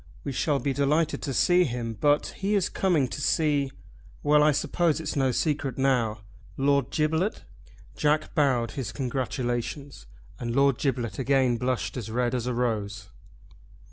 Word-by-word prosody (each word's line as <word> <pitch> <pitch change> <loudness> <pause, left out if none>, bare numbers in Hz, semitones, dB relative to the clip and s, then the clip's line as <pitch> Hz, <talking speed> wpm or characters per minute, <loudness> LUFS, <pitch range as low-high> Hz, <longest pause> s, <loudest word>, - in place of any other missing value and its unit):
We 140 - -3
shall 145 +2 0
be 140 0 -1
delighted 150 +4 +1
to 140 - -3
see 175 +7 +4
him; 120 -5 -3
but 145 +6 +1
he 205 +2 0
is 195 -3 +1
coming 170 -9 +1
to 145 - -5
see. 145 -2 +1 0.5
Well 150 0 +5
I 150 0 +5
suppose 165 +2 +1
it's 160 - -4
no 135 -2 +2
secret 140 -1 -1
now, 120 -5 +1 0.4
Lord 140 0 +2
Giblet?" 160 +6 0 0.5
Jack 155 +1 +1
bowed 130 -6 +2
his 135 -4 -4
congratulations, 125 - -3 0.3
and 120 0 -3
Lord 140 -2 +3
Giblet 130 -5 -2
again 130 -2 +2
blushed 125 +1 -2
as 110 -3 -5
red 120 +1 0
as 125 -1 -2
a 125 - -1
rose. 110 -3 -2
135 Hz, 155 wpm, -26 LUFS, 120-150 Hz, 0.5 s, Well